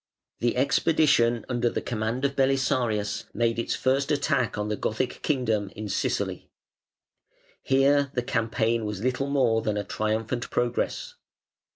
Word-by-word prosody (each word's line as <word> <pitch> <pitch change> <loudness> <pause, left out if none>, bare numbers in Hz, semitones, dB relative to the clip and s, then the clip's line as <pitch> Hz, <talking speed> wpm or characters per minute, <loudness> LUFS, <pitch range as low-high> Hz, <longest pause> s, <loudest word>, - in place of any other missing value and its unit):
] - - -64
The 120 +1 0
expedition 130 -4 +3
under 120 -1 +1
the - - -2
command 115 +3 -2
of 140 0 -1
Belisarius 130 -6 +1
made 115 -1 +1
its 115 - -1
first 135 +3 +1
attack 140 -5 +1
on 105 0 -2
the 105 - -1
Gothic 110 +5 -2
kingdom 115 -8 0
in 110 - -5
Sicily. 95 - -2 1.1
Here 140 +1 +3
the 125 - 0
campaign 115 0 0
was 105 -1 -4
little 130 +2 0
more 125 -5 +2
than 105 -1 -1
a 105 - -1
triumphant 110 +4 -2
progress. 120 0 -1
120 Hz, 145 wpm, -26 LUFS, 110-135 Hz, 1.1 s, expedition